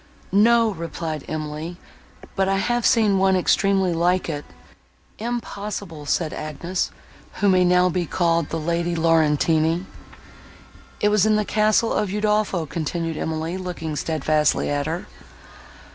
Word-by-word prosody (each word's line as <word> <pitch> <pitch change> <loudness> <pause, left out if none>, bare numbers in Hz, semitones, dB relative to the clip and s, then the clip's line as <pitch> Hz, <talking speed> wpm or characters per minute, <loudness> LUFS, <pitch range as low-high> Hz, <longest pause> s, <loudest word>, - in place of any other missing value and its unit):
"No," 225 +3 +4
replied 165 -3 -5
Emily, 155 +2 -5 0.6
"but 190 0 +1
I 195 - +2
have 240 +4 +1
seen 210 -4 +3
one 190 0 +3
extremely 190 0 +2
like 175 +2 +1
it." 145 -2 -4 0.7
"Impossible," 205 -8 -5
said 160 +1 0
Agnes, 170 +4 -3 0.4
who 205 - 0
may 185 -1 +4
now 180 0 +4
be 180 -1 -1
called 170 -2 +1
the 165 - -3
Lady 170 +2 -1
Laurentini. 160 +1 +2 1.2
"It 210 - +4
was 210 0 +3
in 215 - +3
the 210 0 +1
castle 215 +2 +2
of 210 - 0
Udolpho," 210 -3 0
continued 165 +3 -3
Emily, 160 +3 -3
looking 170 -4 -5
steadfastly 155 0 +1
at 145 0 -1
her. 165 +3 -3
175 Hz, 130 wpm, -22 LUFS, 160-200 Hz, 1.2 s, No